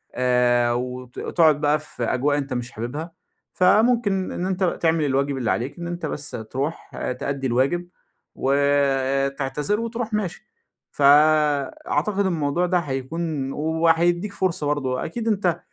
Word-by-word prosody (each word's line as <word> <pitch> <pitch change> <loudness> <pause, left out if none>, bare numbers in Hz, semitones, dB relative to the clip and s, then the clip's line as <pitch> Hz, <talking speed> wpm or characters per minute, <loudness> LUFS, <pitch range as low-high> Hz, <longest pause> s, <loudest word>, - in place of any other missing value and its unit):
آآ، 125 -1 +3
وت 125 0 -5
تقعد 155 -4 +3
بقى 150 0 +2
في 150 -5 -7
أجواء 140 +5 +1
أنت 140 -2 -3
مش 120 -1 -4
حاببها، 145 +9 -5 0.4
فممكن 205 0 +3
إن 180 - -3
أنت 190 0 -1 0.2
تعمل 160 -2 +2
الواجب 140 0 0
اللي 120 -4 0
عليك، 130 +8 -3
إن 170 - -5
أنت 175 -1 -4
بس 145 -1 -5 0.2
تروح 140 +5 -4 0.3
تأدي 140 -1 -2
الواجب 140 +9 +1 0.5
وتعتذر 140 +3 +1
وتروح 230 -1 -4
ماشي. 210 -1 -3 0.5
ف - - -8 0.9
أعتقد 195 +7 0
الموضوع 170 -1 0
ده 180 0 +2
هيكون 145 0 -3
وهيديك 165 +5 +1
فرصة 170 -7 -1
برضو، 135 -3 -1
أكيد 225 - -4
أنت 190 -6 +1
150 Hz, 135 wpm, -23 LUFS, 135-175 Hz, 0.9 s, آآ